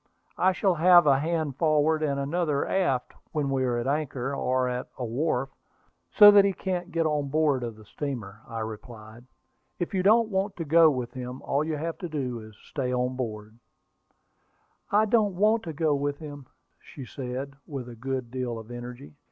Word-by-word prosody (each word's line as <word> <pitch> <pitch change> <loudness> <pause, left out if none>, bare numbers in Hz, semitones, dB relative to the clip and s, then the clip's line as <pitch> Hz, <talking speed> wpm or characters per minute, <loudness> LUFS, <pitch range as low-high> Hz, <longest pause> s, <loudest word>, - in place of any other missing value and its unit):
I 185 - +4
shall 190 0 +1
have 175 +1 +6
a 135 -2 +4
hand 155 -3 -2
forward 155 0 +2
and 140 -2 0
another 150 0 -1
aft 135 -10 0 0.2
whenever 140 -3 -1
we 130 -1 +1
are 120 -1 0
at 120 - -2
anchor, 140 -2 -2
or 130 -1 0
at 125 0 -4
a 125 - -3
wharf, 135 +2 -1 0.6
so 205 -1 +9
that 205 -1 +7
he 200 -1 +1
can't 180 -2 -3
get 165 -1 0
on 150 -2 0
board 150 -3 +2
of 115 -2 -5
the 110 0 -16
steamer," 110 -7 -6
I 115 -1 -5
replied. 110 +1 -9 0.5
"If 175 - -3
you 190 - +1
don't 220 +4 +4
want 195 0 -1
to 165 - -5
go 165 +2 +6
with 125 -4 -3
him, 125 0 -7
all 140 +2 0
you 155 -1 -2
have 165 +2 -4
to 175 - -5
do 130 -6 -3
is 110 -1 -12
to - - -23
stay 130 -4 -2
on 125 0 -1
board." 110 -3 -6 1.3
"I 210 +2 +4
don't 210 -3 +2
want 215 +4 +3
to 165 - -4
go 155 0 +1
with 145 0 -1
him," 145 -4 -9 0.3
said 135 -3 -10
she, 130 -1 -4 0.2
with 135 -4 -6
a 120 - -9
good 130 0 -4
deal 125 -2 -3
of 110 +1 -10
energy. 120 +3 -8
140 Hz, 195 wpm, -27 LUFS, 125-165 Hz, 1.3 s, so